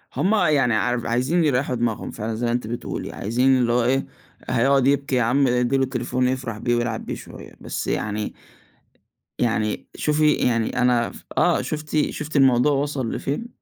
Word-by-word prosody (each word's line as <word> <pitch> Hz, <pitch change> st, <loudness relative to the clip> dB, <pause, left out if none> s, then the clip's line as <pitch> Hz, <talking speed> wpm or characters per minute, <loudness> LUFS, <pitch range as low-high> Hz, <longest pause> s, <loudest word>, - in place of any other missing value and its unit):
هُم 200 Hz, +4 st, +2 dB
يعني 150 Hz, -, +3 dB
عار 120 Hz, +2 st, 0 dB
عايزين 130 Hz, +9 st, +1 dB
يريّحوا 130 Hz, -3 st, +1 dB
دماغهم 115 Hz, -2 st, -2 dB
فعلًا 110 Hz, +1 st, -4 dB
زي 120 Hz, +2 st, -2 dB
ما 120 Hz, -, +1 dB
أنتِ 120 Hz, -2 st, -2 dB
بتقولي. 120 Hz, +1 st, -5 dB
عايزين 125 Hz, +5 st, +2 dB
اللي 120 Hz, -2 st, +1 dB
هو 120 Hz, 0 st, +2 dB
إيه، 135 Hz, +3 st, +1 dB, 0.4 s
هيقعد 130 Hz, +2 st, +3 dB
يبكي 140 Hz, -1 st, +1 dB
يا 125 Hz, -, +3 dB
عم 135 Hz, +4 st, +2 dB
ادّي 125 Hz, +2 st, +1 dB
له 135 Hz, -, +2 dB
تليفون 125 Hz, 0 st, -1 dB
يفرح 130 Hz, -4 st, -3 dB
بيه 120 Hz, +2 st, 0 dB
ويلعب 120 Hz, -1 st, -2 dB
بيه -, -, -4 dB
شوية. -, -, -11 dB
بس -, -, -4 dB
يعني 105 Hz, 0 st, -2 dB, 1.1 s
يعني 110 Hz, -3 st, -1 dB
شوفي 150 Hz, 0 st, +2 dB
يعني 115 Hz, -1 st, 0 dB
أنا 120 Hz, -2 st, +2 dB
ف -, -, -13 dB
آه -, -, +3 dB
شُفتِ 155 Hz, 0 st, -1 dB
شُفتِ 150 Hz, 0 st, -5 dB
الموضوع 135 Hz, +1 st, +4 dB
وصل 140 Hz, -4 st, -1 dB
لفين؟ 150 Hz, -, -3 dB
125 Hz, 175 wpm, -23 LUFS, 120-140 Hz, 1.1 s, الموضوع